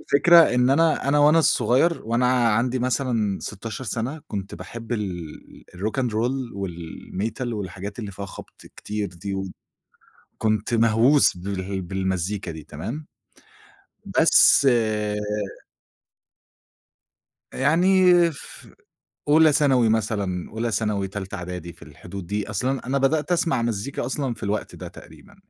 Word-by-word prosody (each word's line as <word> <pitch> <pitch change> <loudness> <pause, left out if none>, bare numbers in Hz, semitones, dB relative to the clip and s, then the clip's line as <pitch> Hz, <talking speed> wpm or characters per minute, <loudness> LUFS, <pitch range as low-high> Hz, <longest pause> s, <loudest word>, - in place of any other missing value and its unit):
الفكرة 170 +4 +5 0.2
إن 125 +1 +3
أنا 155 -1 +2
أنا 145 - +3
وأنا 150 +3 +5
صغير، 160 +3 +2
وأنا 120 +1 +2
عندي 120 +4 +1
مثلًا 120 -5 0
16 110 +5 -6
سَنة، 130 +6 -3
كنت 100 -2 -5
باحب 115 +7 -8
ال 90 -8 -6
الRock 110 +8 -2
and 125 - -1
Roll 120 +3 -2
والMetal، 95 +5 -5
والحاجات 100 0 -6
اللي 105 -4 -5
فيها 100 +1 -7
خبْط - - -12
كتير 105 -2 -4
دي، 90 +3 -6 1.0
وكنت 110 +1 0
مهووس 115 +3 +4
بال 95 +1 -4
بالمزيكا 95 +1 -2
دي 80 -1 -8
تمام؟ 115 - -7 1.1
بس 160 -3 +6 2.9
يعني 180 +7 +3 0.3
في 140 - -13 0.5
أولى 155 +1 +6
ثانوي 130 -6 +3
مثلًا، 100 -5 -1
أولى 115 +1 -2
ثانوي، 105 -2 -1
تالتة 95 0 -6
إعدادي، 90 -2 -7
في - - -24
الحدود 90 0 -10
دي. 105 +1 -3
أصل 110 +4 -2
أنا، 135 -1 -2
أنا 135 +2 +1
بدأت 150 +5 +1
أسمَع 165 -7 +1
مزيكا 120 +3 -3
أصلًا 130 -1 -2
في - - -12
الوقت 105 +1 -3
ده - - -8
تقريبًا. - - -15
110 Hz, 125 wpm, -23 LUFS, 100-130 Hz, 2.9 s, بس